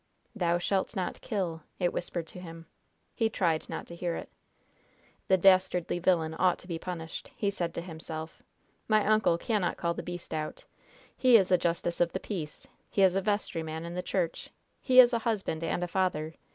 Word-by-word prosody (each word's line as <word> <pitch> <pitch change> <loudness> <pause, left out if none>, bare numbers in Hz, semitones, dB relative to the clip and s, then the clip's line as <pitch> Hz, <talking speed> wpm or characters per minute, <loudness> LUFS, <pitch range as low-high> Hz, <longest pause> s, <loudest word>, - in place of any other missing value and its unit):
"Thou 175 -4 +2
shalt 190 +4 -1
not 185 -2 -3
kill!" 175 -6 -2 0.2
it 175 -2 0
whispered 170 -1 -3
to 170 - -9
him. 165 -2 -9 0.5
He 225 -1 +1
tried 170 -7 0
not - - -5
to 170 - -10
hear 170 -1 -2
it. - - -7 1.0
"The 190 - +5
dastardly 185 -2 +3
villain 165 -3 +2
ought 185 -1 +4
to - - -15
be 170 -3 -3
punished," 165 -2 -6
he 200 -4 0
said 175 -4 -2
to - - -2
himself. 160 -2 -7 0.5
"My 215 -1 +3
uncle 215 -5 +3
cannot 210 -2 0
call 170 0 0
the - - -5
beast 175 -2 -7
out. 155 -1 -4 0.5
He 255 -3 +6
is 190 -3 +1
a 180 - +7
justice 170 0 -1
of 170 -1 +2
the 190 - -1
peace; 170 -9 -6 0.2
he 195 - +2
is 185 -2 +6
a 195 - +2
vestryman 165 -6 -2
in 170 - -6
the 180 - -2
church; 180 -3 -2 0.3
he 255 -1 +5
is 245 -1 +9
a 235 - +2
husband 205 -8 -2
and 170 +2 -1
a - - -1
father. 170 -4 -1
175 Hz, 190 wpm, -29 LUFS, 165-195 Hz, 1.0 s, is